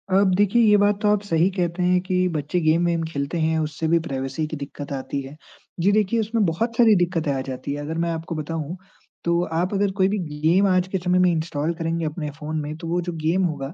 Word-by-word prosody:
अब 195 -2 +4
देखिए, 205 +4 +3
ये 210 -1 +6
बात 205 0 +2
तो 210 - +2
आप 210 -1 +2
सही 175 -2 +2
कहते 180 -1 -1
हैं 180 0 +3
कि 185 -1 +1
बच्चे 150 +5 -1
गेम 160 +2 +3
वेम 170 -1 +1
खेलते 145 +1 -3
हैं, 160 0 +1
उससे 155 +1 -2
भी 170 +1 +4
प्राइवेसी 135 0 -3
की 155 - -5
दिक्कत 145 0 -7
आती 135 +1 -3
है। 135 +2 -10 0.4
जी, 195 +4 +3
देखिए 215 +2 +2
उसमें 220 -1 +1
बहुत 230 +8 -1
सारी 230 -3 +6
दिक्कतें 175 -4 0
आ 135 - -1
जाती 135 +2 -4
हैं 145 - -4
अगर 160 +3 -4
मैं 170 - 0
आपको 165 0 -4
बताऊँ, 160 +2 -4 0.5
तो 170 0 +2
आप 175 +5 0
अगर 200 0 +1
कोई 190 0 +4
भी 205 +1 -1 0.3
गेम 185 +5 +4
आज 185 -1 +2
के 190 - -2
समय 180 0 +1
में 180 -1 +4
इंस्टॉल 160 0 -1
करेंगे 165 0 -1
अपने 155 -1 -3
फ़ोन 155 +1 -3
में 150 +1 -5
तो 165 - -7
वो 175 +1 0
जो 175 - -2
गेम 180 +4 +2
होगा 145 -2 -3
170 Hz, 240 wpm, -23 LUFS, 155-185 Hz, 0.5 s, ये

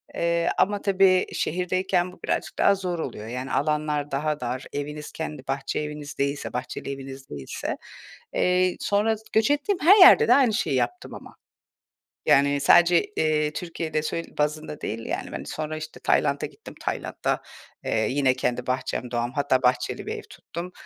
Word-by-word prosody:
Eee, 170 0 +1
ama 205 +1 +2
tabii 190 -2 +4
şehirdeyken 180 +1 0
bu 180 - -17
birazcık - - -2
daha 200 - +5
zor 180 -3 -3
oluyor. 110 -8 -5
Yani, 125 +3 -5
alanlar 150 -1 0
daha 150 +2 -1
dar. 125 +2 -4
Eviniz 150 +1 -5
kendi 150 -4 -6
bahçe 135 0 -2
eviniz 150 -1 -6
değilse, 140 +1 -2
bahçeli 125 +2 -4
eviniz 135 0 -9
değilse. 70 -2 -5 0.6
Eee, 180 0 +2
sonra 215 +2 +1
s 215 - -19
göç 220 +5 +3
ettiğim 320 +7 0
her 380 +7 +7
yerde 390 +4 +9
de - - +7
aynı 260 -6 +4
şeyi 205 - 0
yaptım 360 - -2
ama. - - -12 0.9
Yani, 140 +1 +4
sadece, 175 +4 +5
eee, 155 -1 +1
Türkiye'de 160 -2 -3
sö 165 +2 -2 0.2
bazında 150 0 -2
değil, 115 +1 -4
yani. - - -4
Hani, - - -6
sonra 155 0 -4
işte 155 0 -8
Tayland'a - - +1
gittim. - - -13
Tayland'da, - - -2 0.4
eee, 110 -1 +1
yine, 135 -1 +2
kendi 125 -1 -2
bahçem, 125 -1 -2
doğam, 120 0 -1
hatta 140 -2 +1
bahçeli 125 0 0
bir - - -3
ev - - -8
tuttum. 175 +2 -8
150 Hz, 165 wpm, -25 LUFS, 135-180 Hz, 0.9 s, yerde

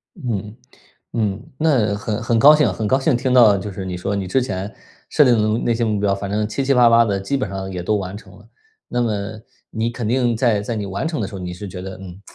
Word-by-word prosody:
嗯， 110 - -4 0.6
嗯， 110 -1 -2
那 130 -10 +2
很 105 +1 -3
很 115 -1 +1
高 150 +5 +8
兴 150 - +2
很 110 -2 -3
高 130 +4 +2
兴 135 0 +2
听 125 +1 0
到 115 -5 +6
就 100 +2 -5
是 95 0 -6
你 90 -1 -4
说 100 +3 -3
你 95 -2 -3
之 130 +8 +1
前 100 -4 -4 0.4
设 - - +5
定 125 -4 +4 0.2
的 - - -1
那 120 - +1
些 115 +1 -1
目 105 -2 0
标， 100 -1 +1
反 100 0 -4
正 105 +1 -1
七 135 +5 -3
七 135 - +3
八 125 -2 +6
八 115 0 +5
地 100 -2 -1
基 115 +9 -2
本 120 -7 -3
上 95 0 -5
也 90 -1 -4
都 105 +4 0
完 95 -1 -4
成 - - -15
了。 - - -18 0.4
那 120 - -1
么 115 -3 0 0.6
你 110 +1 -2
肯 120 -1 -4
定 120 0 +1
在 110 -3 +2
在 115 +3 -4
你 105 -2 -3
完 100 +7 -3
成 160 -7 -3
的 100 - -2
时 100 - -12
候， 95 - -6
你 90 -1 -5
是 100 +3 -8
觉 90 0 -7
得： 95 0 -7
“嗯， 95 0 -10
105 Hz, 285 characters per minute, -20 LUFS, 100-120 Hz, 0.6 s, 高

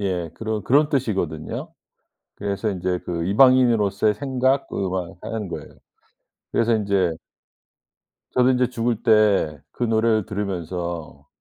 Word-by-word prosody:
예 90 -4 -2
그런 110 -1 -3
그런 145 +3 +4
뜻이거든요. 95 - -2 0.6
그래서 100 +1 -2
인제 90 -2 -2
그 85 -1 -2
이방인으로서의 110 -2 +4
생각 130 +2 0
그 95 -2 -2
막 90 -2 -4
하는 110 -3 -4
거예요. 85 - -7 0.8
그래서 115 0 +2
인제 100 -5 +1 1.2
저도 125 0 +4
인제 125 -1 +2
죽을 115 -2 -1
때 105 - +3
그 - - -4
노래를 110 -2 +2
들으면서 85 - -5
105 Hz, 275 characters per minute, -23 LUFS, 90-115 Hz, 1.2 s, 그런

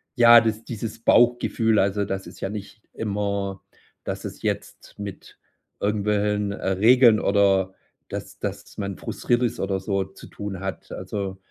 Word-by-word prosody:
ja, 120 -1 +8
dies 110 0 -1
dieses 115 0 -5
Bauchgefühl, 115 -2 +3
also 100 +1 +1
das 95 0 -4
ist - - -13
ja 95 - -2
nicht 105 +1 -8
immer, 100 -2 -2 0.4
dass - - -5
es - - -7
jetzt - - -4
mit 100 -1 -8 0.4
irgendwelchen, 105 0 0
äh, 100 - -3
Regeln 115 +3 +6
oder 95 -2 +3 0.4
dass - - -7
dass - - -6
man 100 -2 -4
frustriert 120 +1 0
ist 120 -1 -1
oder 95 0 -1
so 100 0 -1
zu 95 - -14
tun 100 -2 -6
hat. 95 0 -6
Also, 95 -2 -4
105 Hz, 150 wpm, -24 LUFS, 95-110 Hz, 0.4 s, ja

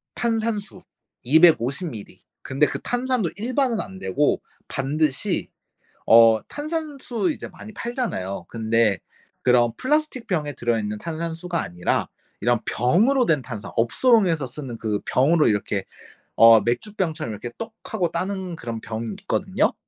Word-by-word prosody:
탄산수 220 -5 -2 0.4
250 155 +2 +4
밀리. 110 -6 -10 0.2
근데 135 +3 +1
그 - - -3
탄산도 245 -6 0
일반은 250 +1 0
안 95 -1 -6
되고 95 +10 +1 0.3
반드시 140 +1 -1 0.6
어 115 -1 +7
탄산수 300 -2 -3
이제 - - -8
많이 215 - -11
팔잖아요? 205 - -3
근데 110 -4 +1 0.4
그런 120 -2 +4
플라스틱 295 -3 0
병에 150 -6 -1
들어있는 110 -4 -1
탄산수가 165 +3 -3
아니라 90 -4 -1 0.3
이런 120 0 +2
병으로 205 - +3
된 150 -8 +3
탄산, 110 -4 -7
업소용에서 170 - +3
쓰는 130 -1 -7
그 110 -2 -1
병으로 150 +5 +3
이렇게 100 -2 -1 0.5
어 115 -1 +8
맥주병처럼 160 - -2
이렇게 110 +3 -6
똑 225 -1 -6 0.2
하고 180 -6 +1
따는 190 -2 -3
그런 115 -5 -5
병이 115 0 -4
있거든요. 200 +6 0
150 Hz, 295 characters per minute, -23 LUFS, -, 0.6 s, 어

